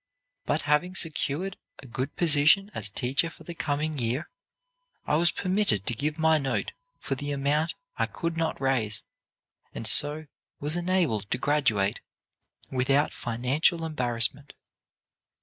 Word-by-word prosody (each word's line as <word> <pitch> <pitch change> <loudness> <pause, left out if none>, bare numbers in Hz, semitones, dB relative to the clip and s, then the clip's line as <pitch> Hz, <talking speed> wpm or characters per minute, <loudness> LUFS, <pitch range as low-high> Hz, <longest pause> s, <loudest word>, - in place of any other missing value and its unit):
But - - 0
having 150 +6 +1
secured 165 +2 0 0.2
a - - -13
good 130 +2 -4
position 165 +5 +4
as 100 -2 0
teacher 135 +10 +1
for - - -15
the 170 - -7
coming 150 -1 -2
year, 120 +5 -2 0.7
I 150 - +1
was 170 +2 +4
permitted 185 - 0
to - - 0
give 150 +7 -2
my 160 -1 +3
note 135 -2 -2 0.3
for - - -4
the 145 +2 -4
amount 145 +3 0 0.2
I - - +2
could 165 -1 -4
not 165 -1 -2
raise, 120 -6 +1 0.7
and - - -5
so 150 +7 +6 0.3
was 150 +3 -1
enabled 175 - 0
to - - 0
graduate 125 -8 +1 0.7
without 135 +3 +1
financial 135 +8 0
embarrassment. 125 -2 0
145 Hz, 135 wpm, -27 LUFS, 125-160 Hz, 0.7 s, so